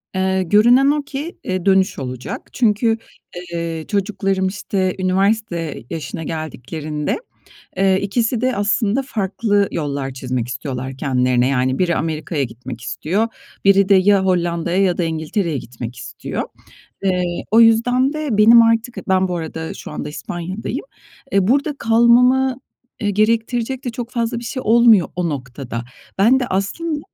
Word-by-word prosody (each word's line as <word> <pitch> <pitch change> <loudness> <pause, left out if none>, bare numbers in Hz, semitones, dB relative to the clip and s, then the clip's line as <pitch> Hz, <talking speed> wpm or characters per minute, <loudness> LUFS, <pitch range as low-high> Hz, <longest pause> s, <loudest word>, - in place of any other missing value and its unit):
Eee, 190 0 +1
görünen 240 +9 +5
o 295 -1 -1
ki, 290 +4 -6
eee, 185 -1 -3
dönüş 190 -3 +3
olacak. 130 -1 -6
Çünkü, 225 -1 +2 0.6
eee, 165 -1 -3
çocuklarım, 195 -2 0
işte, 190 -1 -2
üniversite 185 - 0
yaşına 160 0 -5
geldiklerinde. 155 -1 -4 0.6
Eee, 190 0 +3
ikisi 225 +3 0
de 255 -3 0
aslında 205 +4 +1
farklı 205 -3 0
yollar 140 -3 -3
çizmek 125 -2 -3
istiyorlar 130 0 -5
kendilerine. 125 -2 +1
Yani, 130 0 0
biri 170 -2 +1
Amerika'ya 155 -1 -2
gitmek 120 -1 -7
istiyor. 195 - -1 0.4
Biri 195 0 +5
de 200 - +6
ya 190 0 +4
Hollanda'ya 175 0 +1
ya 180 -2 +1
da 175 - +1
İngiltere'ye 160 0 -2
gitmek 120 0 -8
istiyor. - - -5 0.6
Eee, 180 -2 +1 0.3
o 225 - +7
yüzden 245 +5 +4
de 305 -2 -3
benim 230 +2 +8
artık, 230 +1 +1
ben 190 0 +3
bu 180 - -3
arada, 160 0 -5
şu - - -9
anda, 150 - -5
İspanya'dayım. 180 - -5 0.5
Eee, 195 -1 +2
burada 285 +3 +2
kalmamı, 250 +3 +4 0.5
eee, 205 - +1
gerektirecek 230 +5 0
de - - 0
çok 235 0 -6
fazla 235 -1 -1
bir - - -10
şey 255 +2 -4
olmuyor, 225 -4 +5
o 175 -2 -1
noktada. 125 -3 -5 0.3
Ben 230 +7 +5
de 250 - -2
aslında 295 - -2
190 Hz, 145 wpm, -19 LUFS, 160-230 Hz, 0.6 s, benim